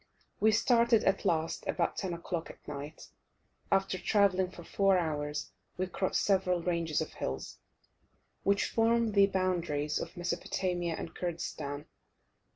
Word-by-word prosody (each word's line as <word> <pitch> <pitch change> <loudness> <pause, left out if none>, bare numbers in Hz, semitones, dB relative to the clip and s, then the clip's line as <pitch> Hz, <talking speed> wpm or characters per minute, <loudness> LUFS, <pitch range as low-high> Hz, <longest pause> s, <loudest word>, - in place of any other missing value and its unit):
We 220 - +5
started 230 0 +4
at 195 +1 +1
last 165 -3 0
about - - 0
10 190 - -2
o'clock 170 0 -4
at - - -14
night. 145 +1 -7 0.6
After 195 -1 +2
travelling 190 -3 +3
for 175 -2 -11
four 195 +2 +3
hours 150 -3 -2 0.3
we 185 - 0
crossed 185 +1 -1
several 180 -3 +2
ranges 170 -3 0
of - - -5
hills, 65 0 -5 0.8
which 200 0 +2
form 230 0 +3
the 200 -1 +6
boundaries 175 -6 0
of - - -6
Mesopotamia 175 -1 -1
and - - -6
Kurdistan. 150 -4 -4
180 Hz, 135 wpm, -31 LUFS, 160-195 Hz, 0.8 s, the